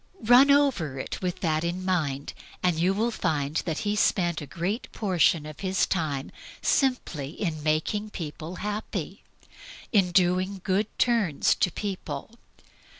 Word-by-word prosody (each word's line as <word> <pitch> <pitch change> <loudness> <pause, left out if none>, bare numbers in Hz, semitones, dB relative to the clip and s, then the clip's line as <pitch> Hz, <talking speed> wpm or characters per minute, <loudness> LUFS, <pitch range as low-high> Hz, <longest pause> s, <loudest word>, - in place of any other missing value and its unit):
Run 245 +5 +7
over 270 - +3
it - - -5
with 180 -2 -3
that 155 -2 +1
in 175 +2 -2
view, 150 -7 0 0.4
and 175 -3 +2
you 180 +3 +3
will 220 +5 0
find 150 -6 -1
that 160 -2 -1
He 205 0 +1
spent 175 -6 +1
a 145 - -7
great 190 - -3
proportion 175 -6 +2
of 155 -1 -9
His 190 -1 +1
time 150 -6 -2 0.3
simply 250 - 0
in 160 -2 -3
making 160 +8 0
people 165 -2 -6
happy, 210 +3 -4 0.7
in 195 -5 +3
DOING 185 +1 +2
GOOD 200 +1 +1
TURNS 220 - +2
to - - +1
people. 185 -6 -5
180 Hz, 145 wpm, -27 LUFS, 155-205 Hz, 0.7 s, Run